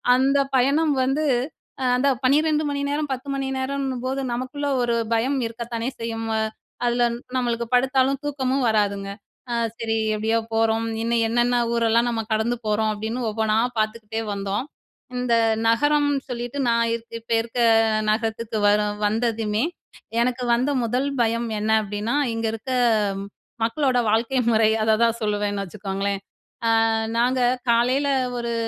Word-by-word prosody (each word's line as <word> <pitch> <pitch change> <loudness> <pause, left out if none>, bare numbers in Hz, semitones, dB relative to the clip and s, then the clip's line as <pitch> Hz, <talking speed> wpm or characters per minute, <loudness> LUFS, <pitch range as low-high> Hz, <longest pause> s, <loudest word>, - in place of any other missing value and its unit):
அந்த 275 +2 +3 0.2
பயணம் 290 +4 +3
வந்து 275 +4 0 0.6
அ - - +1
அந்த 275 +3 +2 0.2
12 305 +3 +3
மணி 280 - -2
நேரம், 295 -1 -2
10 260 +2 -7
மணி 270 -1 -2
நேரம்ன்னும்போது 265 -1 -2
நமக்குள்ள 260 +4 -3 0.2
ஒரு 235 -1 +1 0.2
பயம் 265 +5 +1
இருக்கத்தானே 230 +1 -5
செய்யும். 225 0 -4 0.6
அதுல 240 0 +2 0.3
நம்மளுக்கு 235 -1 -1
படுத்தாலும் 265 +1 +2
தூக்கமும் 270 -2 0
வராதுங்க, 200 -2 0 0.4
அ - - 0 0.2
சரி 225 -1 -1 0.2
எப்டியோ 220 +2 +1 0.2
போறோம், 225 0 +2 0.2
இன்னும் 230 0 +1
என்னென்ன 240 +2 +2 0.2
ஊரெல்லாம் 235 +1 +2
நம்ம 225 -1 -1
கடந்து 220 +3 +1
போறோம், 215 +1 +1
அப்டின்னு 225 +4 -3
ஒவ்வொன்னா 220 0 0 0.2
பாத்துக்கிட்டே 220 0 -2
வந்தோம். 200 +5 -2 0.5
இந்த 250 -1 0 0.3
நகரம்னு 290 +3 +2
சொல்லிட்டு 245 +3 -4
நான் 230 0 +3
இப் 230 0 -10
இப்ப 230 +1 -14
இருக்க 235 +2 -6 0.5
நகரத்துக்கு 225 0 -2
வர 205 +1 +4 0.3
வந்ததுமே 220 0 0 0.6
எனக்கு 250 +1 0
வந்த 255 +5 +1
1ல் 250 +5 0
பயம் 230 +1 0
என்ன 215 +1 0
அப்டின்னா, 210 +5 -2 0.2
இங்க 225 0 -2
இருக்க 225 +4 -6 0.9
மக்களோட 250 +2 +1
வாழ்க்கை 230 +4 +1
முறை 220 0 +4
அததான் 225 +1 +2
சொல்லுவேன்னு 205 -1 -1
வச்சுக்கோங்களேன். 195 0 -3 0.7
அ, - - +2 0.3
நாங்க 250 +2 +2 0.3
காலையில 255 +5 +2 0.3
ஒரு 235 0 -2
235 Hz, 130 wpm, -23 LUFS, 220-260 Hz, 0.9 s, வர